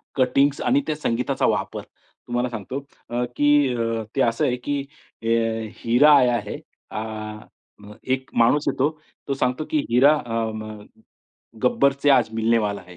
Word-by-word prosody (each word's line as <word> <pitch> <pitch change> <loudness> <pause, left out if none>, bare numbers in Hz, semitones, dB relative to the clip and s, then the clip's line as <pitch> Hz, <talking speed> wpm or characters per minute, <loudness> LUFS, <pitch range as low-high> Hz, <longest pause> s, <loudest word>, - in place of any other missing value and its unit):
Cuttings 135 +2 +2
आणि 280 +3 +2
त्या 155 - 0
संगीताचा 130 -2 -1
वापर. - - -1 0.5
तुम्हाला 120 +1 -1
सांगतो, 115 +4 -5 0.3
अ, 120 +1 -1
की 145 -3 +3
अ, 115 -1 -1
ते 135 - +1
असं 115 -1 +1
आहे 125 - +1
की 145 0 0 0.4
अ, - - -3 0.6
"हरा 125 +6 +5
आया 125 -2 +3
है" - - -5 0.3
आ, 105 - -3 0.8
अ, 105 - -12
एक 130 0 -2
माणूस 145 +6 +2
येतो 140 +1 +1 0.4
तो 140 - 0
सांगतो, 130 +2 -1
की 155 - +2
हिरा 130 +6 +5
अ, 115 - -6 0.2
म 110 -1 -7 0.9
"गब्बरचे 140 - +3
आज 125 -5 +4
मिलनेवाला 110 -2 +1
आहे." 90 -1 -14
125 Hz, 155 wpm, -23 LUFS, 115-140 Hz, 0.9 s, हरा